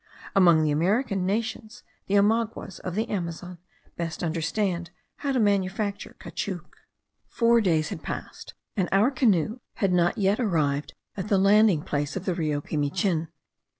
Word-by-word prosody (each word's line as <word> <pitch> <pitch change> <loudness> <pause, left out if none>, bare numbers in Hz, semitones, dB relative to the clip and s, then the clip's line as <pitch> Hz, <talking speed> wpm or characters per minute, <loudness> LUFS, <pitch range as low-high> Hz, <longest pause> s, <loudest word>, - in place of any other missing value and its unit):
Among 170 -5 +6
the 155 - +1
American 195 - +1
nations, 220 +2 -3 0.2
the 200 - +1
Omaguas 215 -2 0
of 180 -1 -5
the 220 +3 0
Amazon 180 -3 -5 0.4
best 165 -1 -4
understand 170 +2 -1 0.3
how 280 - -2
to 260 - +1
manufacture 200 -1 0
caoutchouc. 180 -5 -5 0.6
Four 235 0 +3
days 160 -6 +1
had - - -6
passed, - - -7 0.2
and 190 -5 0
our 205 +7 +4
canoe 225 - +1 0.2
had 195 -3 +1
not 175 -1 +2
yet 200 +2 +2
arrived 150 - 0 0.2
at 190 0 -4
the 205 -2 +3
landing 200 -4 +4
place 145 0 -2
of 190 0 -4
the 185 - +1
Rio 155 -4 -1
Pimichin. 160 +3 -1
190 Hz, 150 wpm, -26 LUFS, 165-215 Hz, 0.6 s, Among